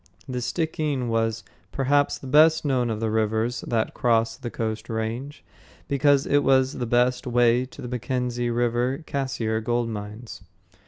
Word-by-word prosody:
The 125 -2 -3
Stickeen 150 -3 -2
was, 115 -1 0 0.3
perhaps, 140 +1 +1
the - - -12
best 155 +4 +5
known 130 -4 +1
of 110 -1 -2
the 110 -1 -1
rivers 110 +2 0
that 115 -2 0
cross 115 -1 +1
the 120 -1 -6
Coast 110 -1 -4
Range, 115 +6 -4 0.4
because 140 0 +3
it 145 0 +2
was 130 -1 +3
the 120 - -2
best 125 +2 +1
way 120 0 +3
to - - -12
the - - -5
Mackenzie 125 0 -2
River 120 +4 0
Cassiar 115 -6 -2
gold 120 0 0
mines. 105 +2 -7
120 Hz, 155 wpm, -24 LUFS, 115-135 Hz, 0.4 s, best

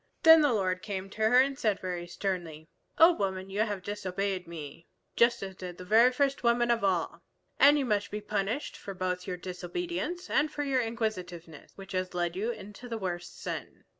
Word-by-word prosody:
Then 325 -1 +9
the 290 -3 +3
Lord 185 -4 0
came 195 -2 -5
to 220 +1 +1
her 250 +2 +6
and 270 +1 +2
said 215 -6 +1
very 180 -2 -4
sternly, 170 -5 -4 0.3
"O 330 +2 +8
Woman, 190 - -3
you 200 - -3
have 205 -4 -1
disobeyed 195 -2 -3
me, 165 -1 -9 0.3
just 235 -2 +3
as 190 -1 -6
did 180 -1 -8
the 180 - -9
very 225 +6 +6
first 275 +1 0
woman 240 0 +3
of 230 -2 +1
all. 185 -4 0 0.4
And 290 +1 +7
you 280 - 0
must 205 -3 0
be 210 - -4
punished 210 +5 -3
both 185 -2 -3
for - - -8
your 180 - -3
disobedience 345 - -4
and 305 0 +1
for 290 - -3
your 270 -3 +1
inquisitiveness 185 -9 -5
which 195 -1 -11
has 185 -1 -2
led 175 -1 -1
you 210 +5 -1
into 230 +1 -8
the 230 - -3
worse 175 -3 -4
sin. - - -7
200 Hz, 195 wpm, -29 LUFS, 180-235 Hz, 0.4 s, Then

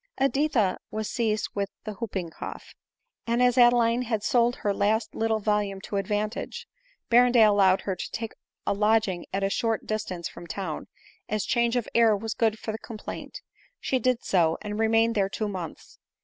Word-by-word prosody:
Editha 270 -7 +1
was 215 -1 -3
seized 215 -3 0
with 200 -1 -2
the 215 - -5
hooping 190 -6 -4
cough; - - -8 0.5
and 235 +1 +1
as 250 -1 +4
Adeline 240 -1 +5
had 225 -4 -2
sold 240 +2 +3
her 205 - -1
last 220 +2 0
little 225 0 +1
volume 205 -2 0
to 200 - -4
advantage, 215 - -3 0.4
Berrendale 240 -2 +6
allowed 195 -2 +4
her 190 - -2
to - - -5
take 225 0 -5 0.3
a - - +1
lodging 210 -3 +1
at 195 +1 -1
a 195 - +2
short 225 0 0
dis 215 -1 -1
tance 175 -3 -5
from 175 - -11
town, 175 -3 -5 0.4
as 215 -1 -1
change 235 0 +1
of 245 -3 0
air 225 -3 +5
was 220 +1 -4
good 220 -2 +1
for 220 - -4
the 220 - -6
com 225 - -8
plaint. - - -7 0.4
She 260 - 0
did 255 -2 +1
so, 165 -4 +2
and 210 0 -4
remained 225 +1 +3
there 195 -3 +1
two 215 +2 -2
months. 185 -5 -7
215 Hz, 185 wpm, -26 LUFS, 200-235 Hz, 0.5 s, Berrendale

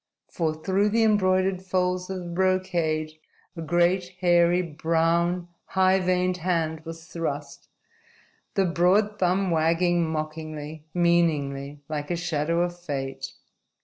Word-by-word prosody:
For 160 -2 -1
through 190 +6 +1
the 225 +2 +2
embroidered 185 -3 +2
folds 180 -1 -1
of 190 - -3
the 180 - -8
brocade, 170 -4 0 0.4
a 165 - -6
great, 175 +2 +1
hairy, 175 0 +4
brown, 170 +2 0 0.2
high 190 0 +3
veined 180 0 +1
hand 165 -3 -1
was 165 0 -8
thrust, 155 -5 -5 0.9
the 195 - +3
broad 190 +5 +2
thumb 185 +1 +1
wagging 170 +2 +2
mockingly, 155 -1 -5
meaningly, 150 -5 +1
like 150 -1 -4
a 175 - 0
shadow 170 -1 0
of 175 0 -2
fate. 135 -5 -5
175 Hz, 120 wpm, -25 LUFS, 160-185 Hz, 0.9 s, hairy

